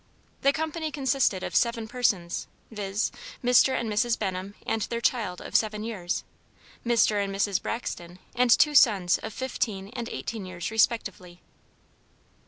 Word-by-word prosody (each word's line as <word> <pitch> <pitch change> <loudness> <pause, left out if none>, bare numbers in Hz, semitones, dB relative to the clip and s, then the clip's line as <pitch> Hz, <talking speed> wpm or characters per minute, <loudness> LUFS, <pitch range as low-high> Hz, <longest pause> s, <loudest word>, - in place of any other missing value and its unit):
The 275 - +5
company 315 +1 -3
consisted 265 -9 +1
of - - -4
seven 235 -2 +1
persons, 220 -8 0 0.2
viz.: 205 -1 -2 0.3
Mr. 250 +2 +5
and 235 - -3
Mrs. 225 +2 +1
Benham 190 0 -4
and 225 - -1
their 235 +2 -2
child 225 -7 0
of - - -9
seven 215 -1 +2
years, 195 -6 -3 0.6
Mr. 220 -3 +3
and 195 - -3
Mrs. 195 -1 +1
Braxton 175 -7 -5 0.2
and 250 0 +2
two 300 +5 +5
sons 200 -10 +5
of 220 - -6
fifteen 210 -5 -3
and 235 0 -5
eighteen 205 -3 -5
years 180 +1 -5
respectively. 200 -5 0
220 Hz, 145 wpm, -27 LUFS, 195-240 Hz, 0.6 s, The